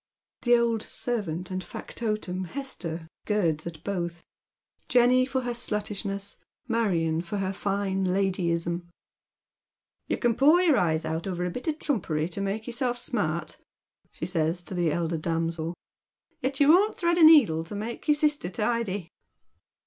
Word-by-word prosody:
The 240 Hz, -1 st, +5 dB
old 230 Hz, -2 st, +1 dB
servant 190 Hz, -9 st, -2 dB
and 185 Hz, 0 st, -3 dB
factotum, 210 Hz, -5 st, -4 dB
Hester, 175 Hz, -, -5 dB, 0.2 s
girds 170 Hz, -7 st, +1 dB
at 165 Hz, -1 st, -8 dB
both, 170 Hz, -4 st, -3 dB, 0.3 s
— -, -, -46 dB
Jenny 250 Hz, +1 st, +5 dB
for 265 Hz, -1 st, -1 dB
her 245 Hz, -1 st, -2 dB
sluttishness, 205 Hz, -3 st, -3 dB, 0.3 s
Marion 175 Hz, -9 st, +1 dB
for 180 Hz, +4 st, -4 dB
her 190 Hz, -1 st, -1 dB
iine 195 Hz, -1 st, -1 dB
ladyism. 175 Hz, -2 st, 0 dB, 0.6 s
" -, -, -61 dB
You -, -, 0 dB
can 240 Hz, -2 st, +2 dB
pore 295 Hz, +8 st, +5 dB
your 340 Hz, -6 st, +4 dB
eyes 160 Hz, -2 st, +1 dB
out 160 Hz, +3 st, -3 dB
over 180 Hz, -1 st, -2 dB
a 180 Hz, -, -2 dB
bit 250 Hz, -, -6 dB
of 310 Hz, -1 st, 0 dB
trumpery 165 Hz, -, -1 dB
to 190 Hz, +3 st, -5 dB
make 200 Hz, +3 st, -2 dB
yourself 245 Hz, 0 st, -1 dB
smart," 170 Hz, -, -2 dB, 0.5 s
she -, -, -5 dB
says 170 Hz, 0 st, 0 dB
to 190 Hz, -, -8 dB
the 175 Hz, -3 st, +1 dB
elder 165 Hz, 0 st, -1 dB
damsel, 165 Hz, +1 st, -2 dB, 0.3 s
" -, -, -47 dB
yet 265 Hz, +1 st, -2 dB
you 285 Hz, 0 st, +5 dB
won't 390 Hz, +7 st, +5 dB
thread 345 Hz, 0 st, +2 dB
a -, -, +6 dB
needle 255 Hz, -, +7 dB
to 170 Hz, +5 st, -7 dB
make 225 Hz, +7 st, -5 dB
your 300 Hz, -, +5 dB
sister 295 Hz, -, +1 dB
tidy." 205 Hz, -3 st, -1 dB
195 Hz, 160 wpm, -27 LUFS, 170-240 Hz, 0.6 s, needle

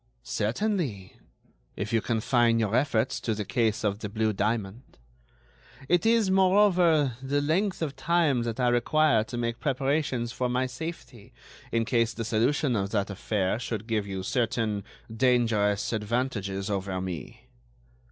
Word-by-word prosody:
"Certainly, 125 Hz, -, -2 dB, 0.6 s
if 105 Hz, +3 st, -4 dB
you 115 Hz, -, +3 dB
confine 115 Hz, +1 st, +2 dB
your 110 Hz, -1 st, 0 dB
efforts 125 Hz, -3 st, +1 dB
to 110 Hz, -, -2 dB
the 105 Hz, -1 st, -4 dB
case 110 Hz, -1 st, 0 dB
of 100 Hz, 0 st, 0 dB
the 105 Hz, -, -5 dB
blue 110 Hz, +1 st, 0 dB
diamond. 105 Hz, +2 st, -3 dB, 0.9 s
It 175 Hz, +7 st, +2 dB
is, 225 Hz, -4 st, +3 dB
moreover, 185 Hz, -, +4 dB
the 140 Hz, +2 st, 0 dB
length 170 Hz, +6 st, 0 dB
of 145 Hz, -3 st, -3 dB
time 150 Hz, -2 st, +2 dB
that 115 Hz, 0 st, -3 dB
I 125 Hz, -1 st, +3 dB
require 120 Hz, 0 st, +3 dB
to 120 Hz, -, -6 dB
make 115 Hz, 0 st, -2 dB
preparations 135 Hz, -3 st, -1 dB
for 125 Hz, +1 st, -2 dB
my 125 Hz, +1 st, +1 dB
safety 130 Hz, -5 st, -8 dB, 0.4 s
in 115 Hz, -1 st, +1 dB
case 115 Hz, -1 st, +1 dB
the 115 Hz, -, -4 dB
solution 120 Hz, +4 st, +1 dB
of 100 Hz, -2 st, -1 dB
that 100 Hz, -1 st, -1 dB
affair 100 Hz, +1 st, -1 dB
should 115 Hz, -3 st, -4 dB
give 110 Hz, -3 st, -1 dB
you 95 Hz, -1 st, -4 dB
certain 115 Hz, -3 st, -1 dB, 0.3 s
dangerous 115 Hz, -5 st, +2 dB
advantages 105 Hz, -3 st, -2 dB
over 95 Hz, -2 st, -2 dB
me." 90 Hz, -7 st, -6 dB
115 Hz, 145 wpm, -27 LUFS, 105-135 Hz, 0.9 s, moreover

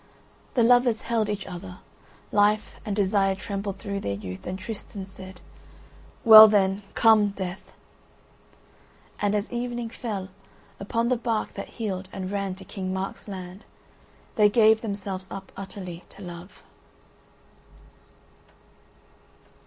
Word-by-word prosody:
The 240 Hz, -, +4 dB
lovers 245 Hz, -1 st, +4 dB
held 225 Hz, -2 st, 0 dB
each 205 Hz, -2 st, -3 dB
other; 180 Hz, 0 st, -8 dB, 0.5 s
life 210 Hz, +1 st, +2 dB
and 210 Hz, -3 st, -3 dB
desire 195 Hz, -1 st, +2 dB
trembled 195 Hz, 0 st, -4 dB
through 200 Hz, 0 st, -4 dB
their 100 Hz, -, -3 dB
youth, 95 Hz, -2 st, -8 dB
and 185 Hz, +1 st, -3 dB
Tristan 195 Hz, 0 st, -7 dB
said, 190 Hz, -1 st, -12 dB, 0.8 s
"Well 220 Hz, -1 st, +12 dB
then, 195 Hz, -1 st, +2 dB
come 220 Hz, -2 st, +5 dB
Death." 190 Hz, -1 st, -6 dB, 1.5 s
And 205 Hz, 0 st, +1 dB
as 210 Hz, +3 st, -2 dB
evening 240 Hz, -1 st, -3 dB
fell, 205 Hz, -7 st, -5 dB, 0.5 s
upon 230 Hz, +4 st, -1 dB
the 255 Hz, -, +2 dB
bark 230 Hz, -2 st, -2 dB
that -, -, -7 dB
heeled 195 Hz, -5 st, -3 dB
and 190 Hz, -1 st, -5 dB
ran 200 Hz, -2 st, -2 dB
to 190 Hz, 0 st, -13 dB
King 185 Hz, -1 st, -5 dB
Mark's 190 Hz, +3 st, -5 dB
land, 185 Hz, 0 st, -8 dB, 0.7 s
they 210 Hz, -1 st, +6 dB
gave 220 Hz, 0 st, +5 dB
themselves 195 Hz, -3 st, -5 dB
up 195 Hz, -1 st, -8 dB
utterly 185 Hz, -3 st, -8 dB
to 200 Hz, -, -12 dB
love. 175 Hz, +1 st, -10 dB
200 Hz, 125 wpm, -26 LUFS, 190-215 Hz, 1.5 s, Well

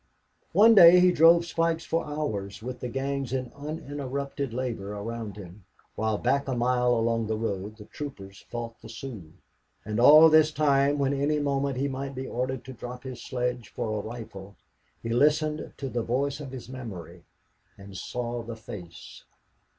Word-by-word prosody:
One 225 Hz, +3 st, +7 dB
day 180 Hz, -3 st, +9 dB
he 180 Hz, 0 st, +6 dB
drove 170 Hz, +1 st, +6 dB
spikes 165 Hz, 0 st, 0 dB
for 165 Hz, +1 st, 0 dB
hours, 110 Hz, -10 st, -4 dB
with 125 Hz, 0 st, -6 dB
the 125 Hz, -, -4 dB
gangs 135 Hz, 0 st, -3 dB
in 130 Hz, -2 st, -3 dB
uninterrupted 140 Hz, -2 st, -5 dB
labor 115 Hz, -5 st, -4 dB
around 110 Hz, 0 st, -6 dB
him, 95 Hz, 0 st, -11 dB, 0.3 s
while 110 Hz, -1 st, -1 dB
back 140 Hz, +5 st, 0 dB
a 130 Hz, -, -1 dB
mile 125 Hz, 0 st, +2 dB
along 115 Hz, -1 st, 0 dB
the 110 Hz, 0 st, -1 dB
road 105 Hz, -1 st, -4 dB
the 105 Hz, -, -11 dB
troopers 100 Hz, -9 st, -9 dB
fought 115 Hz, -1 st, -6 dB
the -, -, -11 dB
Sioux; 115 Hz, -8 st, -8 dB, 0.5 s
and 105 Hz, +1 st, -2 dB
all 150 Hz, +6 st, +9 dB
this 155 Hz, -1 st, +5 dB
time, 145 Hz, -1 st, +2 dB
when 140 Hz, -1 st, +1 dB
any 145 Hz, +2 st, +1 dB
moment 140 Hz, -2 st, -1 dB
he 140 Hz, +2 st, 0 dB
might 135 Hz, 0 st, -5 dB
be 130 Hz, +1 st, -4 dB
ordered 130 Hz, +1 st, -3 dB
to 130 Hz, -, -8 dB
drop 125 Hz, 0 st, -8 dB
his 130 Hz, -3 st, -7 dB
sledge 125 Hz, -2 st, -3 dB
for 110 Hz, -, -3 dB
a -, -, -5 dB
rifle, 110 Hz, -4 st, -9 dB, 0.5 s
he 115 Hz, -, -4 dB
listened 150 Hz, +5 st, +1 dB
to 135 Hz, -, -4 dB
the 120 Hz, -2 st, -2 dB
voice 135 Hz, +5 st, -1 dB
in 140 Hz, -, -7 dB
his 130 Hz, -2 st, -8 dB
memory 95 Hz, -10 st, -9 dB, 0.5 s
and 100 Hz, 0 st, -12 dB
saw 120 Hz, +4 st, -4 dB
the 115 Hz, 0 st, -7 dB
face. 90 Hz, -6 st, -11 dB
125 Hz, 175 wpm, -27 LUFS, 115-140 Hz, 0.5 s, day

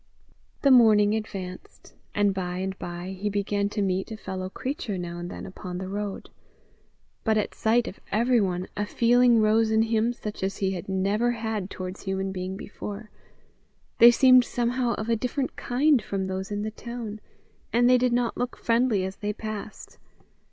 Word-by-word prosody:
The 280 Hz, -, +5 dB
morning 215 Hz, -4 st, +6 dB
advanced, 195 Hz, -4 st, -6 dB, 0.2 s
and 205 Hz, -1 st, +3 dB
by 180 Hz, -1 st, -3 dB
and 190 Hz, +1 st, -3 dB
by 175 Hz, +1 st, -6 dB
he 210 Hz, -, 0 dB
began 200 Hz, 0 st, -1 dB
to 205 Hz, 0 st, -1 dB
meet 190 Hz, +3 st, -1 dB
a 220 Hz, -, -5 dB
fellow 185 Hz, -3 st, -5 dB
creature 255 Hz, -, -4 dB
now 175 Hz, -1 st, -5 dB
and 175 Hz, 0 st, -5 dB
then -, -, -7 dB
upon 185 Hz, -1 st, -7 dB
the 185 Hz, 0 st, -5 dB
road; 205 Hz, 0 st, -5 dB, 0.9 s
but 220 Hz, -1 st, +2 dB
at 210 Hz, -, -1 dB
sight 230 Hz, +2 st, +2 dB
of 190 Hz, -, -8 dB
everyone 205 Hz, -5 st, +1 dB
a 210 Hz, 0 st, -2 dB
feeling 240 Hz, 0 st, +4 dB
rose 220 Hz, +1 st, +3 dB
in 220 Hz, 0 st, +3 dB
him 225 Hz, +1 st, +1 dB
such 215 Hz, -3 st, -7 dB
as 190 Hz, +1 st, -2 dB
he 190 Hz, -1 st, 0 dB
had 180 Hz, -1 st, -6 dB
never 200 Hz, +5 st, +1 dB
had 220 Hz, -4 st, -3 dB
towards 185 Hz, 0 st, -6 dB
human 190 Hz, 0 st, -2 dB
being 185 Hz, 0 st, -4 dB
before: 205 Hz, +1 st, -8 dB, 0.9 s
they 235 Hz, -, +10 dB
seemed 255 Hz, +1 st, +6 dB
somehow 245 Hz, 0 st, 0 dB
of 215 Hz, -, -5 dB
a 230 Hz, -, +2 dB
different 255 Hz, +4 st, -2 dB
kind 270 Hz, +1 st, +2 dB
from 195 Hz, -1 st, -3 dB
those 190 Hz, 0 st, -4 dB
in 205 Hz, 0 st, -3 dB
the 215 Hz, -, -3 dB
town, 225 Hz, -2 st, -7 dB, 0.5 s
and 240 Hz, +1 st, +4 dB
they 250 Hz, 0 st, +5 dB
did 250 Hz, 0 st, +2 dB
not 240 Hz, -1 st, +1 dB
look 245 Hz, 0 st, -3 dB
friendly 230 Hz, -4 st, +2 dB
as 190 Hz, +1 st, -6 dB
they 210 Hz, 0 st, -3 dB
passed. 215 Hz, 0 st, -7 dB
210 Hz, 180 wpm, -26 LUFS, 190-235 Hz, 0.9 s, they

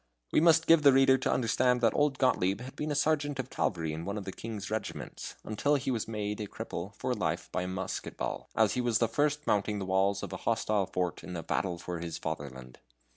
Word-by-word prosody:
We -, -, +4 dB
must 165 Hz, -1 st, +5 dB
give 165 Hz, -1 st, +6 dB
the 140 Hz, -1 st, +7 dB
reader 135 Hz, 0 st, +5 dB
to -, -, 0 dB
understand 125 Hz, +1 st, +2 dB
that 115 Hz, -2 st, +4 dB
old 145 Hz, -2 st, +2 dB
Gottlieb 100 Hz, -7 st, +2 dB
had 130 Hz, +1 st, -8 dB
been 150 Hz, -, -3 dB
a 145 Hz, -, 0 dB
sergeant 145 Hz, -1 st, +1 dB
of 130 Hz, -1 st, -4 dB
cavalry 80 Hz, -5 st, -1 dB
in 80 Hz, +1 st, -5 dB
one 100 Hz, +4 st, -3 dB
of 100 Hz, -, -5 dB
the 95 Hz, -, -4 dB
king's 105 Hz, -1 st, -6 dB
regiments, 110 Hz, -1 st, -5 dB
until 140 Hz, +7 st, +1 dB
he 135 Hz, -1 st, -1 dB
was 115 Hz, -4 st, -2 dB
made 105 Hz, -1 st, -3 dB
a 105 Hz, -, -3 dB
cripple -, -, -6 dB
for -, -, -1 dB
life -, -, -2 dB
by -, -, -1 dB
a 90 Hz, -, -3 dB
musket 95 Hz, 0 st, -4 dB
ball, -, -, -4 dB
as 110 Hz, -2 st, +3 dB
he 125 Hz, -, 0 dB
was 120 Hz, -3 st, +2 dB
the 115 Hz, -, +2 dB
first 150 Hz, +5 st, 0 dB
mounting 105 Hz, +1 st, +1 dB
the 100 Hz, -, -3 dB
walls 95 Hz, +1 st, +1 dB
of -, -, -5 dB
a -, -, -3 dB
hostile 110 Hz, -4 st, 0 dB
fort 90 Hz, -2 st, -2 dB
in 90 Hz, -, -6 dB
a 85 Hz, -, -4 dB
battle 90 Hz, -3 st, -1 dB
for 85 Hz, 0 st, -5 dB
his 85 Hz, -1 st, -4 dB
fatherland. 65 Hz, -5 st, -6 dB
110 Hz, 235 wpm, -30 LUFS, 95-130 Hz, -, the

